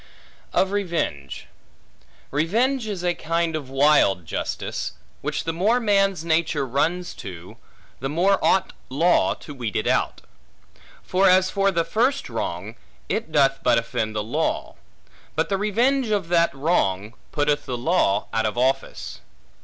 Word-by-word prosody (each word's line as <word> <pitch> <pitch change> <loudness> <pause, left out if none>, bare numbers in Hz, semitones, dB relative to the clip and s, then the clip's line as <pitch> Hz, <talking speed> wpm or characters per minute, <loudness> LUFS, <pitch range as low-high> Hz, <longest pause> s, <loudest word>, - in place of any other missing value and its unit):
Of 190 - +2
Revenge 170 - -2 0.9
REVENGE 225 - +1
is 195 -4 -4
a 175 -1 +2
kind 165 0 -1
of 145 -4 -5
wild 135 - +3
justice; - - -4 0.3
which - - -2
the 165 - -2
more 210 +9 +2
man's 195 -6 +2
nature 160 -3 +1
runs 165 +8 -1
to, 90 -3 -9 0.4
the 135 - -3
more 180 +6 +2
ought 190 - +2 0.2
law 165 +7 +3
to 145 - -10
weed 120 -7 -5
it - - 0
out. - - 0 0.8
For 190 +1 +3
as 185 0 +4
for 195 -1 +2
the 170 -4 0
first 250 +10 0
wrong, - - -4 0.3
it 215 -7 -2
doth 135 -3 +3
but 120 -1 +3
offend 115 -2 -2
the 105 - -1
law; 150 +9 -2 0.6
but - - 0
the 195 - +1
revenge 235 +5 +1
of 200 -5 0
that 170 -1 +3
wrong, 110 - 0 0.2
putteth 145 -1 0
the 125 - -2
law 120 - +1
out 110 -1 +1
of 110 - -4
office. 120 - -1
165 Hz, 145 wpm, -23 LUFS, 130-195 Hz, 0.9 s, as